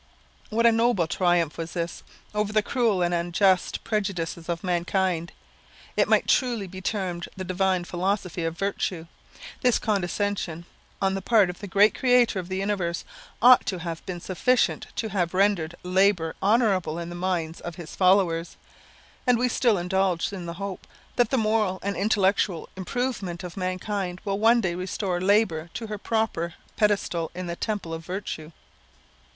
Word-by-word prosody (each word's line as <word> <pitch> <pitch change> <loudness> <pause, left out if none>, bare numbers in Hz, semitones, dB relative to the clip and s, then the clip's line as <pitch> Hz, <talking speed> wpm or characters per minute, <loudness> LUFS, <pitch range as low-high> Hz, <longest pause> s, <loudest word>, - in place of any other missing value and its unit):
What 230 +2 +1
a 235 - +8
noble 225 -5 +2
triumph 175 -2 +1
was 165 0 -5
this, 170 -1 -3 0.3
over 210 0 0
the 215 0 +2
cruel 225 -8 +1
and 175 0 +1
unjust 175 +2 +2
prejudices 180 -6 -2
of 170 +1 -2
mankind! 175 -1 0 0.6
It - - +3
might - - +3
truly 240 -6 +2
be 185 0 -9
termed 185 -4 -3
the 190 - -4
divine 185 0 +1
philosophy 180 0 -2
of 165 0 -2
virtue. 190 -4 -2 0.6
This 250 -2 +4
condescension 195 -4 -1 0.4
on 190 0 +2
the 195 - -2
part 205 -3 +4
of 180 - -15
the 205 - -7
great 200 +3 +5
Creator 245 -5 +3
of 180 0 -7
the 190 - -2
universe, 190 -4 -1 0.4
ought 250 0 +8
to 190 - -1
have 165 -1 -5
been 180 -2 -4
sufficient 220 +9 +1
to 220 - -2
have 185 -3 -1
rendered 185 -4 +2
labour 180 -2 +2
honourable 195 -6 +2
in 170 0 -5
the - - -7
minds 175 -3 -2
of 175 -1 -6
his 170 -2 -9
followers; 180 -3 +2 0.7
and 250 -1 +5
we 250 +2 +2
still 235 -3 +2
indulge 180 -1 0
the 175 -4 -5
hope, 195 +1 -6 0.3
that 240 -2 +3
the 265 - +1
moral 215 -4 +1
and 200 0 -1
intellectual 195 -3 +1
improvement 195 -3 -3
of 180 -1 -7
mankind 185 0 -3
will 195 0 -1
one 230 +2 +5
day 180 -4 0
restore 180 0 -2
labour 185 -5 +2
to 230 - -4
her 210 -1 -5
proper 195 -7 -1 0.2
pedestal 200 -6 +1
in 185 0 -4
the 170 0 -4
temple 205 -5 -3
of 165 0 -5
virtue. 175 -3 -5
190 Hz, 165 wpm, -26 LUFS, 175-210 Hz, 0.7 s, a